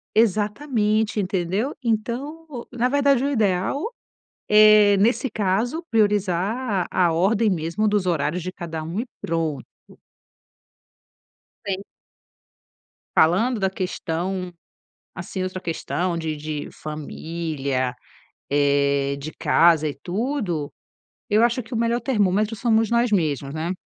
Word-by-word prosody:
Exatamente, 215 0 +1
entendeu? 190 - -1
Então, 250 +5 -3
na 245 0 0
verdade, 280 -2 +3
o 285 - +1
ideal, 210 - +1 0.7
eh, 210 -1 +7
nesse 235 +7 +2
caso, 220 - 0
priorizar 205 0 +1
a 185 - +1
a 165 - +1
ordem 205 +6 +2
mesmo 170 +4 -1
dos 205 -3 +1
horários 170 +1 0
de 180 - -4
cada 165 -4 -6
um 165 +5 -5
e - - -2 0.2
pronto. 165 -3 -2 2.0
Entende? 195 0 -3 1.3
Falando 210 +9 +3
da 190 - +2
questão, 180 0 -3 0.6
assim, 185 +2 -5
outra 185 0 -4
questão 175 +1 -2
de 160 -2 -3
de 150 -1 -5
família, 150 -4 -3 0.6
eh, 140 -1 +2
de 155 +3 -7
casa 165 -2 +3
e 140 - -7
tudo. 190 - -2 0.6
Eu 215 +1 +4
acho 240 +1 +1
que 225 +3 -9
o - - 0
melhor 235 +1 +1
termômetro 210 -3 +1
somos 225 0 +2
nós 235 0 +2
mesmos, 145 -7 0
né? 160 +3 -2
195 Hz, 120 wpm, -23 LUFS, 165-225 Hz, 2.0 s, eh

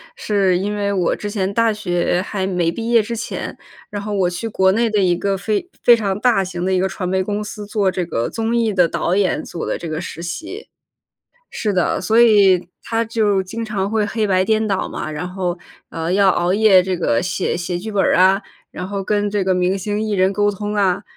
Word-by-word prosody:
是 200 - +1
因 205 +2 -2
为 200 -1 -1
我 180 -3 +1
之 210 - -5
前 200 -2 -1
大 230 +1 +2
学 175 -3 0
还 195 -3 -3
没 180 -3 0
毕 230 +5 -4
业 230 -1 +6
之 230 +2 -4
前， 225 - -5 0.3
然 205 -1 -5
后 210 +1 -4
我 190 -3 +1
去 175 +5 -4
国 190 -3 +2
内 230 +2 +1
的 210 - +2
一 180 -2 +3
个 200 +2 -1
非 210 - -2 0.2
非 240 - +8
常 200 -3 -1
大 225 -5 +3
型 175 -1 -5
的 190 - 0
一 185 - +2
个 190 - +1
传 180 -1 -4
媒 190 0 +1
公 205 +2 -3
司 210 0 -7
做 205 -2 0
这 180 -1 -2
个 115 -8 -2
综 225 +1 -2
艺 225 -2 +1
的 180 -3 +4
导 175 +3 -1
演 195 -2 +1
做 170 - -6
的 - - -2
这 170 - -7
个 155 +1 -3
实 170 -1 -7
习 320 - -6 0.8
是 210 - -2
的， 180 -2 +1
所 220 +5 +3
以 200 -6 +5
它 230 0 -1
就 215 -3 +1
经 225 +5 -5
常 200 -3 -2
会 215 0 0
黑 215 +1 -1
白 185 -2 +2
颠 220 +1 +1
倒 195 -2 -1
嘛， - - -5
然 155 +4 -4
后， 180 -2 -2 0.3
呃， 165 +2 -3
要 195 0 +4
熬 175 +1 +1
夜 200 -3 +5
这 185 0 -2
个 115 -9 +1
写 180 -1 -1
写 175 0 -3
剧 215 +4 -6
本 200 - +2
儿 - - +3
啊， 190 +2 +4 0.3
然 180 - -6
后 200 -1 -3
跟 205 0 0
这 205 -2 0
个 190 0 +2
明 180 +2 +1
星 205 +2 -2
艺 220 - -2
人 190 0 +2
沟 205 +1 +2
通 205 +1 -4
啊， 190 -3 +1
195 Hz, 250 characters per minute, -19 LUFS, 185-215 Hz, 0.8 s, 非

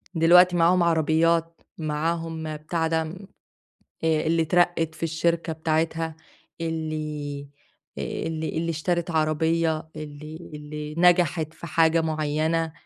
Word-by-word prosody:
دلوقتي 175 +2 +6
معاهم 175 +1 +4
عربيات، 165 +1 +2 0.2
معاهم 160 0 -2
بتاع 160 +2 -1
ده 160 0 +1
م 185 +5 -9 0.8
آآ، 160 -1 +2
اللي 165 0 +2
اترقّت 165 -1 +2
في 160 - -16
الشركة 165 +1 0
بتاعتها، 160 0 -1 0.4
اللي 155 -3 -4 0.5
اللي 160 -1 -3
اللي 165 0 -1
اشترت 170 +2 -1
عربية، 160 0 +1
اللي 155 +1 -8 0.2
اللي 150 0 -7
نجحت 170 -3 +3
في - - -9
حاجة 165 0 +3
معيّنة، 160 +1 0
160 Hz, 110 wpm, -25 LUFS, 155-165 Hz, 0.8 s, دلوقتي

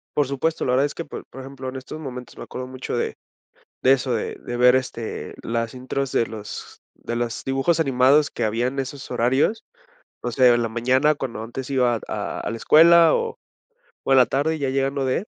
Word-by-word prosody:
Por 145 -3 +2
supuesto, 150 +4 -1
la 125 - +1
verdad 135 +3 +3
es 145 - -5
que, 165 - -5
por - - -8
por 135 - -10
ejemplo, 135 -1 -7
en 130 - -9
estos 130 +4 -7
momentos 125 -4 -8
me - - -7
acuerdo 130 0 -7
mucho 130 -1 -5
de - - -2 0.7
de 130 - +5
eso, 130 -2 0
de 110 - -2
de 120 - -6
ver, 125 +1 +6
este, 120 -3 -4
las 115 0 -2
intros 130 +1 -3
de 115 - +2
los 105 -2 -9
de 120 - -6
los 120 -1 -3
dibujos 135 +6 +1
animados 135 +1 +4
que - - -3
había 115 +3 0
en 135 +1 -3
esos 135 +1 -5
horarios, 130 - +1 0.6
o 120 - -3
sea, 130 +1 +3
de 120 - +4
la 115 -1 0
mañana 130 +6 +2
cuando 120 -5 -5
antes 130 +4 -6
iba 125 -4 +2
a - - -4
a - - -3
la 115 - -4
escuela 165 +6 +6
o 465 0 -2 0.7
o - - -2
en 135 - +6
la 125 - +7
tarde 155 +5 0
ya 140 -3 -1
llegando 135 0 0
de 130 +9 0
130 Hz, 215 wpm, -23 LUFS, 120-140 Hz, 0.7 s, la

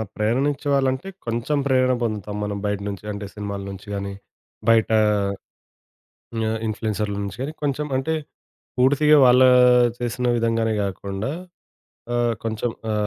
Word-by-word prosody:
ప్రేరణిచ్చే 135 +7 0
వాళ్ళంటే 135 +4 +1 0.2
కొంచెం 120 +5 -1
ప్రేరణ 130 -1 +3
పొందుతాం 105 -2 -3
మనం. 105 -1 -3
బయట 105 -1 -1
నుంచి 100 -1 -5
అంటే 100 0 -5
సినిమాల 100 -1 -5
నుంచి 95 +1 -9
గానీ, 100 0 -3 0.6
బయట 115 -1 +4 0.2
ఆహ్, 100 -2 -1 1.1
ఇన్‌ఫ్లుయెన్సర్ల 105 -1 -2
నుంచె 100 +6 -4 0.2
కొంచెం 145 +1 -1
అంటే 135 +5 0 0.7
పూర్తిగా 145 +4 +5
వాళ్ళ 125 +1 +6 0.6
చేసిన 125 +1 -2
విధంగానే 115 -1 +1
గాకుండా 100 +3 -4 0.8
ఆహ్, 120 -1 +2
కొంచెం 115 +1 -2 0.2
ఆ - - 0
115 Hz, 120 wpm, -23 LUFS, 105-130 Hz, 1.1 s, వాళ్ళ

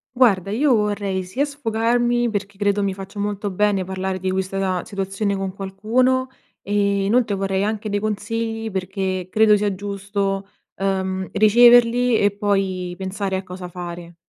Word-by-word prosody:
Guarda 200 -7 +3
io 260 +4 +3
vorrei 205 -3 -1
sia 220 +11 -1
sfogarmi 240 -3 0
perché 200 -2 -4
credo 205 0 +1
mi 195 -1 0
faccia 195 +2 -10
molto 205 0 -2
bene 195 0 +1
parlare 190 0 -3
di 185 +1 -2
questa 190 +1 -2
na 185 -2 -1
situazione 195 +1 -2
con 190 -1 -3
qualcuno, 230 +7 +1 0.4
ehm, 205 - -3 0.3
inoltre 225 +1 +2
vorrei 195 0 -1
anche 215 +1 -2
dei 205 0 -1
consigli 225 +1 -2
perché 190 -1 -3
credo 215 -1 +5
sia 205 -1 0
giusto, 200 0 -3 0.3
uhm, 190 -1 -2
riceverli 240 +3 +5
e 205 0 +3
poi, 195 -3 -1
pensare 190 0 -3
a 190 - -5
cosa 180 0 -8
fare. 175 -1 -8
200 Hz, 150 wpm, -21 LUFS, 190-220 Hz, 0.4 s, credo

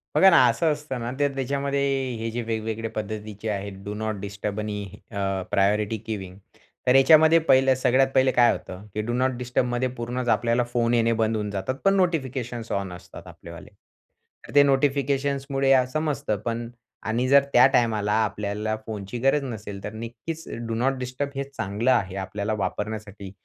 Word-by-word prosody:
बघा 190 - +7
ना, 170 - +6
असं 165 -2 +2
असतं 150 -4 -4
ना 120 +1 -4
तर 145 -1 +1
त्याच्यामध्ये 140 +1 -1 0.4
हे 115 0 -3
जे 120 - -3
वेगवेगळ्या 110 0 -3
पद्धतीचे 105 0 -5
आहेत, 100 -1 -3
डू 105 - -4
नॉट 110 0 -3
डिस्टर्ब 100 +1 -4
आणि 105 -1 -3 0.3
अ, 100 - -6 0.3
प्रायोरिटी 105 +2 +2
गिविंग 95 -4 -5 0.5
तर 125 - +5
याच्यामध्ये 160 +4 +7
पहिलं 135 -4 +4
सगळ्यात 130 +1 +3
पहिले 130 0 +4
काय 120 -1 +5
होतं, 95 +3 -7
की 105 - -1
डू 120 +3 -3
नॉट 130 +2 +1
डिस्टर्बमध्ये 125 0 0
पूर्णच 125 +1 -3
आपल्याला 120 +1 +2
फोन 120 0 +1
येणे 115 0 +3
बंद 110 0 +1
होऊन 105 -1 -2
जातात, 100 +6 -3
पण 195 0 +5
नोटिफिकेशन्स 130 - -1
ऑन 100 -2 -2
असतात 90 0 -12
आपल्यावाले. 85 -1 -11 0.8
तर - - -12
ते 145 - +8
नोटिफिकेशन्समुळे 140 0 +1 0.2
समजतं 150 -9 -1
पण 115 0 -3 0.4
आणि 120 +3 0
जर 140 0 +7
त्या 125 +1 +8
टायमाला 110 -5 +1
आपल्याला 105 +1 -2
फोनची 105 +1 -6
गरज 135 +3 +2
नसेल, 105 -5 -7
तर 105 - -5
नक्कीच 120 +9 -7 0.2
डू 115 - -2
नॉट 130 +4 0
डिस्टर्ब 130 +3 -3
हे 140 - -1
चांगलं 115 -3 -1
आहे 95 -7 +1
आपल्याला 100 +3 -3
वापरण्यासाठी, 105 -2 -5
115 Hz, 165 wpm, -25 LUFS, 105-135 Hz, 0.8 s, ते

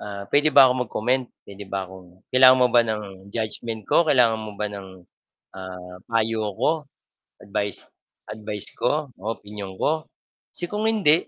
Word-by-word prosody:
Ah, 100 -1 -6
puwede 150 +2 +4
ba 140 -2 +10
akong 125 0 +3
mag-comment, 125 +4 0 0.2
puwede 100 0 -10
ba 95 -1 -2
akong 90 -1 -15
kailangan 130 0 +8
mo 125 - +6
ba 120 - +7
ng 110 -1 -2 0.3
judgment 110 +1 -4
ko? - - +1
Kailangan 115 -5 +4
mo 110 -1 -7
ba 105 - -2
ng, 100 -1 -8 0.6
ah, 90 -1 -9
payo 115 -1 0
ko, - - +2 0.7
advice 100 0 -3 0.4
advice 105 -1 -5
ko 150 +4 0
o - - -16
opinyon 100 -2 -9
ko? 155 +1 0 0.4
Kasi 175 - -2
kung 210 +1 -2
hindi, 185 -8 +3
110 Hz, 160 wpm, -24 LUFS, 100-130 Hz, 0.7 s, ba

